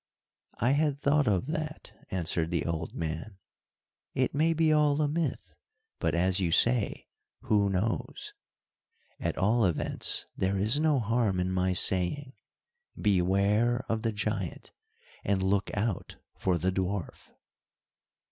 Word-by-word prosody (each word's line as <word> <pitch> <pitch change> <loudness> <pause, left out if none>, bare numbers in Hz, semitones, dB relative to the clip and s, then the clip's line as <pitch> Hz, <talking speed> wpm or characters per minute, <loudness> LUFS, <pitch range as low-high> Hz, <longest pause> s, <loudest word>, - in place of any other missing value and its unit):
"I 120 +4 +3
had 145 -1 +1
thought 145 -1 +2
of 95 -1 +2
that," 155 +1 -5 0.2
answered 85 -2 -1
the 85 -4 -1
old 85 -1 -3
man. 80 +5 -4 0.8
"It 130 -1 +1
may 155 +3 +2
be 160 -1 +3
all 150 -1 +3
a 150 - +2
myth, 155 -2 -2 0.5
but 80 -1 0
as 90 +2 +2
you 90 -4 0
say 115 +4 +2 0.4
'who 100 -2 +2
knows!' 100 +4 -2 0.9
At - - -2
all 110 +4 +3
events 90 -5 0
there 95 +1 0
is 110 +9 +3
no 155 -3 +3
harm 110 -4 +1
in 90 +1 0
my 95 0 +1
saying, 95 +10 +1 0.7
beware 105 +5 +2
of 110 -1 -1
the 115 0 0
giant, 105 -4 -3 0.5
and 95 -1 0
look 100 +1 +1
out 105 -3 -2 0.2
for 90 -2 0
the 90 +3 0
dwarf." 95 0 -3
105 Hz, 135 wpm, -29 LUFS, 95-130 Hz, 0.9 s, I